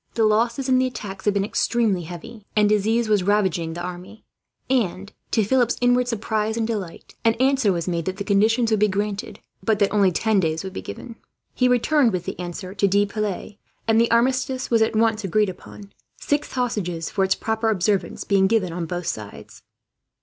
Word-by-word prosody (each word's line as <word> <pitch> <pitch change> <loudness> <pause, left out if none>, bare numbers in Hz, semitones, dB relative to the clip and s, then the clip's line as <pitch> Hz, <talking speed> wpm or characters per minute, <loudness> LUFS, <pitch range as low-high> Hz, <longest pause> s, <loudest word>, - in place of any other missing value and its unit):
The 225 - +2
losses 230 +5 +1
in 255 -1 +4
the 255 - +2
attacks 195 -6 -7
had 205 -1 +2
been 200 0 +1
extremely 210 -5 0
heavy, 175 +6 -9
and 210 -1 +4
disease 220 +3 +2
was 210 -2 +3
raging 190 -3 +1
in 160 - -5
the 175 - -5
army 180 +4 -8 0.4
and, 205 -6 -1 0.2
to 220 - +2
Philip's 245 +2 +2
inward 245 0 +3
surprise 220 -1 -1
and 225 - 0
delight, 205 -7 -5
an 225 0 +3
answer 260 -3 +2
was 170 -2 -2
made 170 -2 -1
that 185 0 -3
the 200 - -3
conditions 220 +4 +2
would 215 - +2
be 210 - +4
granted, 205 +1 -3 0.2
but 210 +2 +1
that 200 0 +1
only 200 -3 +4
ten 215 +3 +1
days 160 -1 -1
would 190 -1 -6
be - - -5
given. 230 -2 -9 0.4
He 250 - +2
returned 250 0 +3
with 180 -1 -2
the - - -5
answer 180 +1 -6
to 200 0 +2
De 200 +1 +3
Piles, 210 -1 -4 0.3
and 225 0 +4
the 235 - +2
armistice 255 +2 +1
was 230 -1 +4
at 220 0 +2
once 220 -1 +2
agreed 210 +2 +1
upon, 195 +2 -11 0.2
six 290 0 -1
hostages 200 -10 -2
for 195 - +1
its 190 - +2
proper 220 0 -1
observance 200 -1 0
being 195 -1 +3
given 190 -6 +1
on 170 -1 -4
both 175 +1 -4
sides. 105 -7 -7
210 Hz, 200 wpm, -23 LUFS, 190-230 Hz, 0.4 s, in